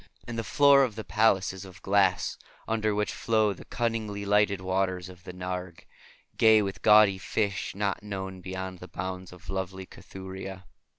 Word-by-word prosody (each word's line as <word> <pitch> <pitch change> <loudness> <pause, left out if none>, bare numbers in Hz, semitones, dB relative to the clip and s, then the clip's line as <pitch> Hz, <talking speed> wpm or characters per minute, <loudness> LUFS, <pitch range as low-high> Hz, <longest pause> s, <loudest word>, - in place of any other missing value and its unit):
And 120 - -5
the 115 - -2
floor 140 +2 +5
of 120 -6 -1
the 110 - -5
palace 100 0 +2
is 95 0 -8
of 95 -2 -13
glass, 95 -2 +2 0.3
under 110 -2 0
which 105 0 -1
flow 110 -3 +1
the - - -13
cunningly 110 -4 -2
lighted 105 -1 +3
waters 95 -1 -1
of 90 -1 -14
the - - -6
Narg, 90 -1 -5 0.6
gay 110 -1 +6
with 95 -1 -5
gaudy 105 -3 +6
fish 100 -2 -2
not 100 -1 -1
known 95 -2 -6
beyond 95 0 -6
the 90 - -9
bounds 95 +1 -6
of 90 -1 -15
lovely 95 0 -4
Cathuria." 95 0 -9
95 Hz, 170 wpm, -28 LUFS, 95-105 Hz, 0.6 s, gay